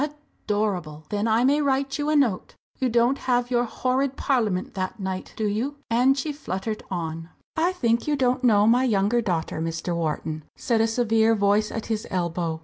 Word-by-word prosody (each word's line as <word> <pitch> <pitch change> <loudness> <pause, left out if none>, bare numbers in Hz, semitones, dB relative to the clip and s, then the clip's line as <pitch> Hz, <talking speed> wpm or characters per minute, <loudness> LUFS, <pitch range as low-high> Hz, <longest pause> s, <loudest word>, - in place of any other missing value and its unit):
"Adorable! 185 -8 -1
Then 205 +2 -1
I 225 +2 +3
may 285 +3 +3
write 275 0 0
you 290 +1 0
a 305 - +2
note? 245 -10 +1 0.2
You 260 - +1
don't 240 +3 +2
have 245 -1 0
your 240 0 +2
horrid 260 +3 -1
Parliament 220 -10 0
that 185 +2 -4
night, 190 -1 -4
do 220 - -1
you?" 225 +8 -1 0.2
and 255 +4 +4
she 300 +3 -2
fluttered 215 -6 -4
on. 165 -2 -4 0.3
"I 335 +3 +2
think 235 -8 0
you 300 - +2
don't 255 -1 +1
know 210 -4 +5
my 240 +3 +4
younger 220 0 +2
daughter, 170 -6 -2
Mr. 165 +1 -2
Wharton?" 155 -1 -3
said 230 -3 +1
a 225 - +3
severe 225 -1 +2
voice 205 +1 +2
at 225 - -4
his 220 -2 -3
elbow. 170 -3 -2
225 Hz, 185 wpm, -24 LUFS, 185-255 Hz, 0.3 s, know